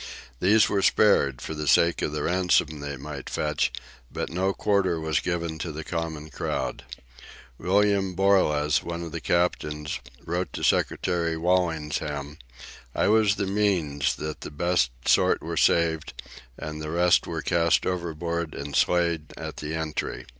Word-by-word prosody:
These 105 +4 +5
were 100 - +1
spared, 70 -12 +3
for - - -5
the 75 -1 -4
sake 85 +4 +4
of - - -1
the 75 -1 -3
ransom 90 -4 +2
they 70 0 -5
might 70 0 -7
fetch, 75 -4 0 0.4
but - - -4
no 95 +3 +1
quarter 95 -4 +1
was 80 -1 0
given 85 -2 -3
to 85 - -4
the 80 +1 -6
common 80 -2 -4
crowd. - - -3 0.8
William 100 0 +2
Borlas, 75 -7 +3
one 85 0 -5
of 85 - -7
the - - -5
captors, 75 -4 -1 0.3
wrote 90 +2 -2
to - - -5
Secretary 85 -2 +1
Walsingham: 80 -4 -1 0.6
"I - - +2
was 105 -2 +4
the 100 - -1
means 95 -9 +1
that 75 0 -6
the - - -6
best 75 -3 +1 0.2
sort - - +3
were - - -4
saved; 80 -2 +1 0.4
and 75 0 -6
the 75 - -5
rest 85 +2 +3
were - - -4
cast 85 -1 +2
overboard 85 -2 -3
and 70 0 -5
slain 85 -3 +2
at - - -6
the 75 +1 -4
entry." 80 -1 -3
85 Hz, 155 wpm, -26 LUFS, 75-90 Hz, 0.8 s, These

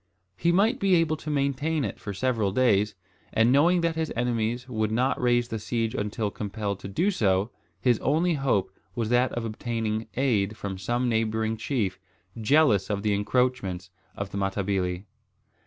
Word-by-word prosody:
He 170 - +2
might 215 +9 +3
be 195 -2 +4
able 165 -2 +2
to 155 - -7
maintain 140 +1 0
it 100 - -5
for 100 - -5
several 110 -1 0
days; 105 -3 +2 0.4
and 115 +2 +3
knowing 170 +6 +4
that 165 -1 0
his 160 -1 -2
enemies 120 0 -1
would 110 -4 -1
not 125 +4 +1
raise 120 -1 +2
the 110 - -3
siege 115 +1 -2
until 105 0 -2
compelled 100 -1 -4
to - - -7
do 175 - +1
so, 100 - +1 0.3
his 120 +1 +2
only 165 +5 +2
hope 135 -11 0 0.2
was 115 -2 -1
that 125 +1 +3
of 120 -1 -3
obtaining 110 -1 -3
aid 110 -5 +1
from 95 -2 -5
some 120 +6 0
neighbouring 110 -1 0
chief, 110 -5 -2 0.4
jealous 115 -3 +3
of 100 -1 -2
the 105 -1 +2
encroachments 100 -4 0 0.3
of 100 -1 -4
the 100 - -3
Matabili. 95 -1 -1
115 Hz, 170 wpm, -26 LUFS, 100-130 Hz, 0.4 s, be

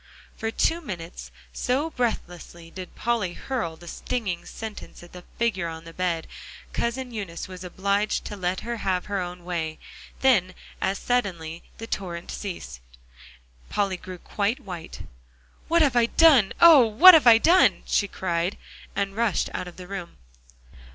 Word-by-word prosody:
For 225 - -3
two 330 +8 +1
minutes, 180 - -7 0.2
so 280 +6 -1
breathlessly 175 - -4
did 185 0 -9
Polly 225 -7 -1
hurl 225 -11 -3
the 175 +2 -14
stinging 200 -4 -3
sentences 220 -5 -8
at 175 - -14
the 180 -1 -10
figure 210 -7 0
on 160 0 -7
the 165 0 -11
bed, 175 -3 -1 0.5
Cousin 250 +2 -2
Eunice 195 -7 -6
was 185 -1 -9
obliged 200 +3 -1
to 210 - -5
let 185 -1 -2
her 235 +1 -4
have 185 -4 -1
her 200 -1 -2
own 180 -1 -6
way. 160 -3 -3 0.4
Then 185 -9 +3 0.3
as 195 +1 0
suddenly, 175 -10 -2 0.2
the 225 - -7
torrent 175 -6 -5
ceased. 170 - -6 0.9
Polly 200 -2 0
grew 185 0 -9
quite 205 +6 -2
white. 175 -4 -8 0.7
"What 335 0 +4
have 275 -4 +2
I 235 -1 +4
done 275 -9 +5
oh! 330 -5 +9
what 265 - +9
have 310 -6 +6
I 230 -1 +9
done?" 350 +10 +4
she 200 - +1
cried, 175 -1 -2 0.4
and 195 0 -2
rushed 230 -3 0
out 180 - -4
of 180 - -11
the 180 - -9
room. 185 -2 -7
195 Hz, 160 wpm, -25 LUFS, 175-235 Hz, 0.9 s, oh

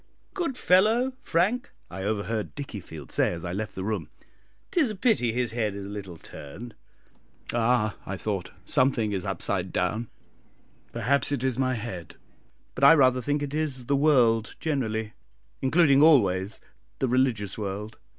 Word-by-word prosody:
"Good 335 -9 -2
fellow, 225 +8 +3
Frank!" 205 +10 +1 0.2
I 95 +2 -6
overheard 105 +2 -2
Dickiefield 95 - -8
say, - - +1
as 85 -1 -6
I 85 - -3
left 105 +2 -4
the 95 - -4
room; 100 -6 -3 0.6
"it - - -7
is 285 -7 +3
a 215 - -4
pity 195 - +2
his 120 +1 -1
head 110 -3 -1
is 100 -1 -6
a - - -7
little 100 -4 -7
turned!" 105 +12 -10 0.8
"Ah," 115 -3 +2
I 100 - -5
thought, 100 -2 -3 0.2
"something 125 -5 +2
is 95 -1 -3
upside 95 0 -2
down; 110 +6 -1 0.8
perhaps 140 +3 +1
it 135 -3 -1
is 130 -1 0
my 130 -1 +1
head, 100 -7 -6 0.6
but 130 - -5
I 140 +4 +9
rather 130 -3 +4
think 145 +3 -1
it 140 0 -4
is 145 -5 -2
the 140 - +1
world 125 -7 +3
generally, 110 -8 -2 0.5
including 140 0 +4
always 100 - +4 0.4
the 135 - 0
religious 120 -6 +1
world. 105 +2 -5
120 Hz, 160 wpm, -26 LUFS, 100-140 Hz, 0.8 s, I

